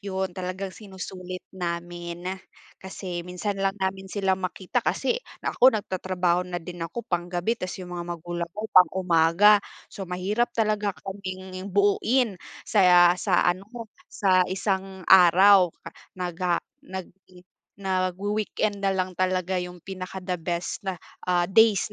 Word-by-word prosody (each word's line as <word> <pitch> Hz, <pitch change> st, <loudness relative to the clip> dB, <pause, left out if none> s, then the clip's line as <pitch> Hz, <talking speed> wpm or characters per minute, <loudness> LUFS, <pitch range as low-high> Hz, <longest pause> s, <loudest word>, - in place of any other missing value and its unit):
Yun 190 Hz, -2 st, -3 dB
talagang 185 Hz, +1 st, -5 dB
sinusulit 185 Hz, -2 st, -8 dB
namin. 175 Hz, -1 st, -5 dB, 0.6 s
Kasi, 185 Hz, -2 st, -6 dB
minsan 180 Hz, +3 st, -4 dB
lang 195 Hz, +1 st, 0 dB
namin 190 Hz, 0 st, -3 dB
sila 195 Hz, -1 st, 0 dB
makita 185 Hz, 0 st, -2 dB
kasi 485 Hz, +1 st, 0 dB, 0.2 s
ako 255 Hz, -3 st, +4 dB
nagtatrabaho 185 Hz, -3 st, 0 dB
na 175 Hz, -, -3 dB
din 175 Hz, +1 st, -8 dB
ako- 165 Hz, +8 st, -5 dB
pang-gabi- 175 Hz, +6 st, -1 dB
'tas 185 Hz, 0 st, -4 dB
yung 180 Hz, -1 st, -8 dB
mga 175 Hz, 0 st, -5 dB
magulang 170 Hz, +1 st, -5 dB
ko 215 Hz, -, -4 dB
pang-umaga, 180 Hz, +2 st, +5 dB, 0.3 s
so 195 Hz, -3 st, -7 dB
mahirap 200 Hz, +7 st, 0 dB
talaga 210 Hz, -3 st, 0 dB
kaming 185 Hz, -1 st, -6 dB
buoin 205 Hz, +2 st, +2 dB, 0.2 s
sa 180 Hz, -4 st, +6 dB
sa 185 Hz, -4 st, +2 dB
ano, 195 Hz, +3 st, -13 dB, 0.4 s
sa 185 Hz, -2 st, +3 dB
isang 190 Hz, -1 st, -2 dB
araw 190 Hz, +1 st, +7 dB, 0.5 s
naga 175 Hz, -1 st, -1 dB, 0.3 s
nag 190 Hz, -5 st, -7 dB, 0.6 s
nag-wi-weekend 200 Hz, +2 st, -1 dB
nalang 190 Hz, -2 st, 0 dB
talaga 185 Hz, 0 st, 0 dB
yung 180 Hz, 0 st, -6 dB
pinaka 190 Hz, 0 st, -6 dB
the 180 Hz, -2 st, -3 dB
best 170 Hz, +1 st, -3 dB, 0.5 s
ah, 175 Hz, -1 st, +3 dB
days 215 Hz, -1 st, +4 dB
185 Hz, 125 wpm, -25 LUFS, 180-195 Hz, 0.6 s, araw